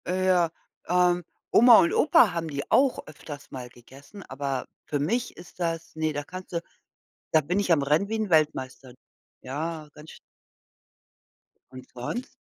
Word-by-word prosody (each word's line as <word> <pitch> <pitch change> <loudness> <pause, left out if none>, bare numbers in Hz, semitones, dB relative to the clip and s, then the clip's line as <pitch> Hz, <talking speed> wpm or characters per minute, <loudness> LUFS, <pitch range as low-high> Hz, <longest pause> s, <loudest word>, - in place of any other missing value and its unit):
Äh, 185 +1 0
ja, 175 -3 +3 0.4
ähm, 180 0 +2 0.3
Oma 235 0 +8
und 170 - +2
Opa 280 - +5
haben 165 -1 -3
die 140 -2 -5
auch 270 -1 +3
öfters 145 -1 -10
mal 125 -2 -7
gegessen, 135 - -14
aber 135 -2 -4 0.2
für 145 - -2
mich 235 - -1
ist 175 0 -14
das 165 -2 -3
ne, 155 -1 -1
da 145 0 -3
kannst 185 +4 -10
du 170 - -1 0.7
da 155 - +5
bin 175 +7 -1
ich 200 -3 0
am 160 -4 +4
rennen 150 +8 +2
wie 225 - -1
'n 215 -2 -2
Weltmeister. 135 -5 0 0.5
Ja, 155 +4 -5
ganz 150 +1 -13
sch - - -13 1.5
Und 130 0 -11
sonst? 130 - -5
160 Hz, 165 wpm, -26 LUFS, 140-185 Hz, 1.5 s, Oma